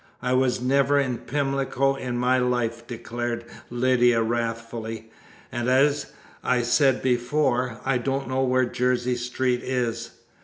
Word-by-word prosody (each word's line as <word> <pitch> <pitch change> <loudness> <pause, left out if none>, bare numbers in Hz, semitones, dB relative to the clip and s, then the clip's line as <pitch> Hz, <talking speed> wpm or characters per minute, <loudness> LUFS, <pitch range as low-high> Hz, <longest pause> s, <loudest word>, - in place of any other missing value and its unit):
"I 125 +1 +1
was 130 -1 +2
never 140 +3 +3
in 130 -4 -1
Pimlico 135 -1 0
in 125 -3 -4
my 125 +1 +2
life!" 120 -2 -1
declared 120 0 -4 0.2
Lydia 120 -1 +3
wrathfully, 115 -1 -4 0.4
"and, 120 +1 -2
as 140 +2 +3 0.4
I 125 -1 +1
said 135 +2 +3
before, 125 -1 0
I 135 -1 +1
don't 135 +2 -2
know 130 0 0
where 130 0 +2
Jersey 125 0 0
Street 125 0 -1
is." 115 -2 -2
125 Hz, 130 wpm, -25 LUFS, 120-130 Hz, 0.4 s, never